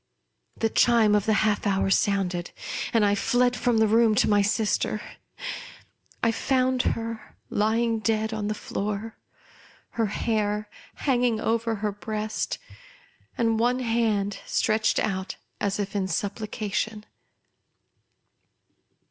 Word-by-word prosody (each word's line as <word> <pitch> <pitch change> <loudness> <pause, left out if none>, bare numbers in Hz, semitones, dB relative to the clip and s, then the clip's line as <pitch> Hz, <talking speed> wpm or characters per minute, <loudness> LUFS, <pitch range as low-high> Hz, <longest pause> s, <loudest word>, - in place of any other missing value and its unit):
The 225 -1 0
chime 230 -3 +4
of 210 0 +2
the 220 - +4
half 210 0 +1
hour 195 -1 +1
sounded; 185 -4 +1 0.4
and, 225 -3 +3
I 200 - +3
fled 245 +4 +2
from 245 -2 +1
the 220 0 +4
room 225 0 +4
to - - +3
my 205 -1 +4
sister. 210 0 0 1.2
I 230 - +4
found 255 +1 +1 0.2
her 230 0 -7
lying 225 +2 +1
dead 220 0 0
on 210 -1 -2
the 215 - -1
floor; 210 +2 -4 0.7
her 225 -2 0
hair 210 0 -1 0.4
hanging 245 -4 +2
over 230 0 0
her 210 0 -2
breast, 215 +1 -3 0.8
and 225 -1 +2
one 245 +2 +2
hand 225 -4 0
stretched 215 0 +1
out 190 -3 -1 0.2
as 200 0 -1
if 200 0 -3
in 195 -2 0
supplication. 210 +2 -3
215 Hz, 120 wpm, -26 LUFS, 205-230 Hz, 1.2 s, chime